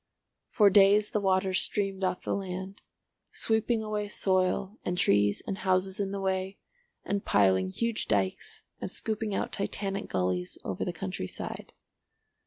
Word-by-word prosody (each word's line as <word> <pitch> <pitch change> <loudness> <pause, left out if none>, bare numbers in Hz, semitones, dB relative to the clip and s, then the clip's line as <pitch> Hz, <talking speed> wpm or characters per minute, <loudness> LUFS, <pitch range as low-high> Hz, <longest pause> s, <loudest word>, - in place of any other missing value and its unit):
For 205 -2 +5
days 205 +1 +5
the 210 - +1
water 190 -1 +2
streamed 195 0 0
off 185 -1 -1
the - - -1
land, 190 0 -5 0.5
sweeping 220 0 0
away 210 -1 -2
soil 190 +1 +1
and 180 - -2
trees 100 - +3
and 195 -1 -4
houses 190 +1 +1
in 200 -1 0
the 200 - -3
way, 190 0 -1 0.5
and 200 -1 -1
piling 95 -2 +3
huge 230 - -2
dykes 95 -2 -1 0.2
and - - -4
scooping 215 -2 -2
out - - -2
Titanic 195 0 -2
gullies 90 -1 -1
over 95 - -3
the - - -2
country 175 - -4
side. - - -6
190 Hz, 150 wpm, -29 LUFS, 180-205 Hz, 0.5 s, For